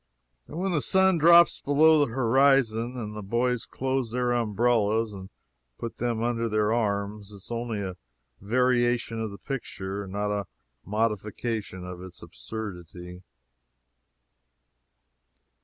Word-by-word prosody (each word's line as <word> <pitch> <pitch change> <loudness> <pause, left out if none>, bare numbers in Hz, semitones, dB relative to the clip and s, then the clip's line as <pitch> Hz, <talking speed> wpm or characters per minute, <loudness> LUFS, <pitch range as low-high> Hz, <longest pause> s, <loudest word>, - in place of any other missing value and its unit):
And 155 - -8
when 190 +2 -1
the 155 -4 +1
sun 190 0 +3
drops 170 +2 +6
below 155 +2 +4
the 145 -5 +1
horizon 125 -1 +2
and 105 -3 -5
the 105 - -5
boys 120 +4 -1
close 130 -2 -2
their 125 +1 0
umbrellas 115 -1 +1
and 95 -1 -9 0.5
put 115 - -6
them 115 -1 -1
under 115 -1 0
their 105 0 +1
arms, 100 -2 -2
it - - -11
is 100 +3 -13
only 115 -3 -3
a 95 -2 -5 0.4
variation 120 +1 +1
of 110 -1 -2
the 100 - -9
picture, 100 -7 -5
not 105 +2 -2
a 100 -2 -2 0.4
modification 105 -2 -2
of 90 0 -8
its 95 -1 -11
absurdity. 90 - -8
115 Hz, 130 wpm, -27 LUFS, 100-125 Hz, 0.5 s, drops